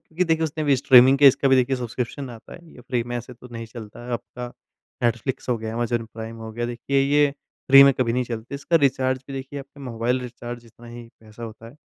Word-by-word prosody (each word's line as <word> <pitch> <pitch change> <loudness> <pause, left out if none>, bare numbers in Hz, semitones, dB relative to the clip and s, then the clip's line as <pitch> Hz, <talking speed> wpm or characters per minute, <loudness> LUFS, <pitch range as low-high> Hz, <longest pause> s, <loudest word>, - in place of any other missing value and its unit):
क्योंकि 175 +3 -2
देखिए 160 -1 +1
उसने 155 0 -3
भी 140 -2 +3
स्ट्रीमिंग 130 +1 +6
के 145 - +7
इसका 135 +1 +2
भी 135 - +5
देखिए 130 +1 +2
सब्स्क्रिप्शन 125 +2 -5
आता 115 -2 -12
है - - -10 0.2
ये - - -13
फ्री 125 -1 -2
में 120 0 -4
ऐसे 120 +1 -7
तो 125 +1 -14
नहीं 115 0 -6
चलता 115 0 -11
है 125 - -5
आपका 125 +1 -5 0.6
नेटफ्लिक्स 120 +3 -1
हो 120 - +2
गया, 110 0 -5
अमेज़न 120 -1 -1
प्राइम 115 0 -7
हो 110 0 -8
गया 120 +1 -3
देखिए 130 +3 -1
ये 145 +1 +3 0.4
फ्री 135 0 +11
में 140 0 +7
कभी 120 -3 0
नहीं 125 0 0
चलती 115 +3 -6
इसका 150 +4 +1
रिचार्ज 130 -3 +1
भी 140 - -8
देखिए 135 +1 -6
आपका 140 +1 -12
मोबाइल 120 +3 -1
रिचार्ज 120 -1 -7
जितना 120 +1 -17
ही 120 0 -10
पैसा 110 +1 -14
होता 115 0 -9
है। 125 - -16
125 Hz, 240 wpm, -23 LUFS, 115-135 Hz, 0.6 s, फ्री